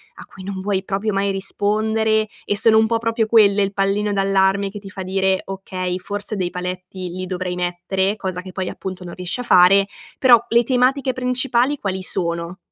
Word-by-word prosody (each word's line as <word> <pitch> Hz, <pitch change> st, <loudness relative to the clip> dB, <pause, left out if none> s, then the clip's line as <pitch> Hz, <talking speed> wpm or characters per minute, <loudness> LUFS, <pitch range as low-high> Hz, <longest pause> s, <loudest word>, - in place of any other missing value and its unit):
a -, -, -11 dB
cui 190 Hz, -, -13 dB
non 190 Hz, 0 st, -5 dB
vuoi 195 Hz, -1 st, -1 dB
proprio 200 Hz, +2 st, -2 dB
mai 195 Hz, 0 st, 0 dB
rispondere, 215 Hz, +3 st, 0 dB, 0.2 s
e 205 Hz, -, 0 dB
sono 220 Hz, +2 st, +5 dB
un 220 Hz, -, +5 dB
pò 230 Hz, 0 st, +1 dB
proprio 230 Hz, 0 st, 0 dB
quelle 210 Hz, -2 st, +4 dB
il 195 Hz, 0 st, -2 dB
pallino 200 Hz, +1 st, 0 dB
d'allarme 195 Hz, 0 st, +2 dB
che 205 Hz, +1 st, -8 dB
ti 200 Hz, -1 st, -11 dB
fa 195 Hz, -, -7 dB
dire: 190 Hz, 0 st, 0 dB
"Okay, 185 Hz, -2 st, -4 dB
forse 205 Hz, +2 st, -4 dB
dei 185 Hz, -3 st, -2 dB
paletti 180 Hz, 0 st, -6 dB
li 185 Hz, +2 st, -5 dB
dovrei 180 Hz, -1 st, -4 dB
mettere," 180 Hz, +3 st, -1 dB
cosa 185 Hz, -4 st, -4 dB
che 185 Hz, -, -9 dB
poi, 185 Hz, 0 st, -4 dB
appunto, 185 Hz, -1 st, -7 dB
non 175 Hz, -1 st, -8 dB
riesci 180 Hz, +5 st, -4 dB
a -, -, -3 dB
fare. 195 Hz, -1 st, +5 dB, 0.3 s
Però, 240 Hz, -3 st, +6 dB
le 235 Hz, +1 st, +4 dB
tematiche 260 Hz, +2 st, +1 dB
principali 255 Hz, +2 st, 0 dB
quali 190 Hz, -2 st, -3 dB
sono? 170 Hz, 0 st, 0 dB
195 Hz, 195 wpm, -20 LUFS, 185-220 Hz, 0.3 s, Però